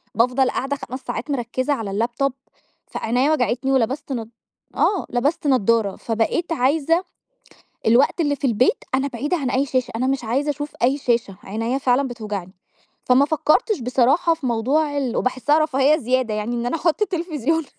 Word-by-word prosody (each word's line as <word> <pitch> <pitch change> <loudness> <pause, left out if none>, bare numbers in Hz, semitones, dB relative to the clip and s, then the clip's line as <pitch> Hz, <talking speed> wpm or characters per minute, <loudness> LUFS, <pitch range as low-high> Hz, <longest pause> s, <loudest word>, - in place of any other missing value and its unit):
بافضل 250 +3 +3
قاعدة 270 +2 -2
5 260 -2 -7
ساعات 295 - -4
مركزة 255 +2 -1
على 225 -7 -4
اللابتوب 240 +6 -1 0.5
فعينيّا 250 +6 0
وجعتني 260 -2 0
ولبست 265 +3 0
نض 225 -3 -5 0.5
آه 400 -3 +1
لبست 290 +6 0
نضارة. 230 -5 +2
فبقيت 230 +10 -1
عايزة 320 +5 +2 0.8
الوقت 245 +9 +4
اللي 290 -2 +1
في 280 - -1
البيت 250 +3 +2
أنا 270 +1 0
بعيدة 285 +7 -2
عن 275 -5 -2
أي 270 +3 +1
شاشة، 255 -2 -1
أنا 250 +3 0
مش 270 -1 -1
عايزة 265 +6 -1
أشوف 290 +1 -4
أي 265 +3 +3
شاشة، 235 -8 -1
عينيّا 225 +6 -2
فعلًا 265 0 +2
بتوجعني. 210 -6 -6 0.5
فما 255 +3 +5
فكرتش 315 +7 +1
بصراحة 260 +7 +3
في 320 -4 -7
موضوع 280 +6 +1
ال 260 -4 -1
وباحسها 260 +4 +1
رفاهية 300 -1 +3
زيادة 255 -4 0
يعني 215 +3 -2
إن 235 0 -2
أنا 245 - -1
أحط 335 +4 0
التلفزيون 325 - -1
260 Hz, 160 wpm, -21 LUFS, 235-290 Hz, 0.8 s, فما